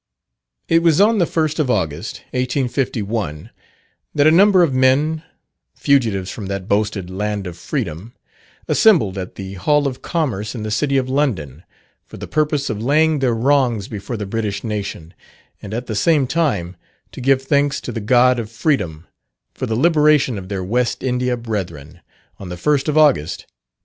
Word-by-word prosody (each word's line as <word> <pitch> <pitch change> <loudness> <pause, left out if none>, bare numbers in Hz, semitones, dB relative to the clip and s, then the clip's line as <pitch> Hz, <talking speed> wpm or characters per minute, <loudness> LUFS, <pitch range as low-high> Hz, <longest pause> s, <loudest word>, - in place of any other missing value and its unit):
It 165 0 +3
was 165 -1 +3
on 215 +2 +4
the 175 - +2
first 155 -1 -1
of 145 -4 +1
August, 85 -11 -2
1851, 120 - -2 0.6
that 145 -1 +3
a 155 - +7
number 190 +1 +6
of 150 -6 +1
men, 135 +5 +2 0.5
fugitives 110 -10 +1
from 100 - -7
that 100 -1 -4
boasted 100 -3 -1
land 105 +1 -3
of 90 -2 -6
freedom, 105 - -5 0.5
assembled 160 - +4
at 90 - -7
the 95 -1 -7
Hall 145 +10 +1
of 130 -2 -3
Commerce 125 - -2
in 110 - -5
the 110 - -4
City 140 +6 +1
of 130 -1 0
London, 105 - -1 0.5
for - - -11
the - - -7
purpose 150 -2 0
of 110 -2 -3
laying 155 +4 +2
their 125 -3 +1
wrongs 120 -4 +1
before 110 +2 -6
the 105 - -4
British 105 -1 -3
nation, 100 -6 -5 0.5
and 100 - -8
at 120 +3 -4
the 110 - -4
same 145 +6 +2
time, 125 - -1 0.4
to - - -9
give 135 +1 +2
thanks 140 0 +1
to - - -5
the 115 - -4
God 125 +3 +4
of 110 -2 -5
Freedom 105 - -1 0.5
for - - -4
the 110 - -1
liberation 150 - +3
of 95 0 -10
their 95 -2 -3
West 120 +6 -1
India 125 -1 0
brethren, 85 -9 -6 0.4
on 95 - -8
the 90 - -6
first 145 - +1
of 150 - 0
August, 145 - +3
1834. - - -24
120 Hz, 175 wpm, -19 LUFS, 100-145 Hz, 0.6 s, a